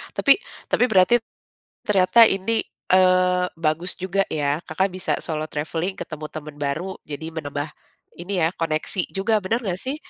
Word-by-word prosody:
Tapi -, -, +5 dB, 0.3 s
tapi 245 Hz, -, +3 dB
berarti 210 Hz, +2 st, +5 dB, 0.6 s
ternyata 210 Hz, +3 st, +5 dB
ini, 220 Hz, +4 st, 0 dB, 0.3 s
eee, 185 Hz, -1 st, +4 dB
bagus 165 Hz, +2 st, -1 dB
juga 190 Hz, +1 st, 0 dB
ya, 145 Hz, +1 st, -1 dB
Kakak 190 Hz, +4 st, -1 dB
bisa 185 Hz, -, -2 dB
solo 155 Hz, -1 st, -2 dB
traveling 165 Hz, +5 st, -3 dB
ketemu 155 Hz, -1 st, -6 dB
temen 150 Hz, -1 st, -8 dB
baru 155 Hz, +7 st, -2 dB, 0.2 s
jadi 160 Hz, +3 st, -6 dB
menambah 145 Hz, -1 st, -4 dB, 0.5 s
ini 185 Hz, 0 st, -2 dB
ya, -, -, +4 dB
koneksi 165 Hz, +3 st, -1 dB
juga 210 Hz, +2 st, +1 dB
bener 225 Hz, +6 st, -1 dB
gak 185 Hz, -2 st, -2 dB
sih? 270 Hz, +3 st, -2 dB
180 Hz, 150 wpm, -23 LUFS, 155-195 Hz, 0.6 s, Tapi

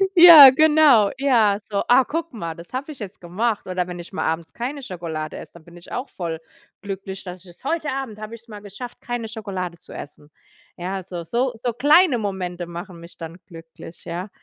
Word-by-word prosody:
Ja, 335 Hz, -6 st, +11 dB
genau. 295 Hz, -8 st, +5 dB
Ja, 230 Hz, -7 st, +3 dB
so: 205 Hz, -1 st, -3 dB
„Ah, 255 Hz, +2 st, +6 dB
guck 330 Hz, +1 st, -4 dB
mal, 170 Hz, -7 st, -5 dB
das 170 Hz, +7 st, -13 dB
habe 280 Hz, +4 st, -4 dB
ich 275 Hz, -, -12 dB
jetzt 205 Hz, -1 st, -8 dB
gemacht.“ 205 Hz, +6 st, -2 dB
Oder 180 Hz, -1 st, -1 dB
wenn 175 Hz, -1 st, -7 dB
ich 175 Hz, -, -11 dB
mal -, -, -2 dB
abends 160 Hz, 0 st, -3 dB
keine 265 Hz, +5 st, -5 dB
Schokolade 165 Hz, -6 st, -6 dB
esse, -, -, -11 dB
dann 170 Hz, -2 st, -15 dB
bin 170 Hz, 0 st, -16 dB
ich 175 Hz, -, -15 dB
auch 255 Hz, +3 st, -4 dB
voll 165 Hz, -3 st, -5 dB, 0.4 s
glücklich, 195 Hz, -1 st, -7 dB
dass 180 Hz, -1 st, -8 dB
ich -, -, -19 dB
es: 175 Hz, -, -21 dB
„Heute 310 Hz, 0 st, -1 dB
Abend 260 Hz, -6 st, -5 dB
habe 215 Hz, +2 st, -7 dB
ich 230 Hz, -, -15 dB
es 235 Hz, -, -25 dB
mal 210 Hz, -2 st, -10 dB
geschafft, 210 Hz, +5 st, -10 dB
keine 240 Hz, -2 st, -4 dB
Schokolade 195 Hz, -6 st, -5 dB
zu -, -, -17 dB
essen.” 145 Hz, +1 st, -10 dB, 0.5 s
Ja, 185 Hz, +2 st, -4 dB
so 175 Hz, -2 st, -7 dB
so 240 Hz, +8 st, -1 dB
so 235 Hz, +1 st, -3 dB
kleine 295 Hz, -, +4 dB
Momente 185 Hz, -4 st, -4 dB
machen 175 Hz, 0 st, -8 dB
mich 170 Hz, -, -13 dB
dann 165 Hz, 0 st, -8 dB
glücklich, 165 Hz, -1 st, -12 dB
ja, 180 Hz, +4 st, -5 dB
200 Hz, 210 wpm, -22 LUFS, 175-245 Hz, 0.5 s, Ja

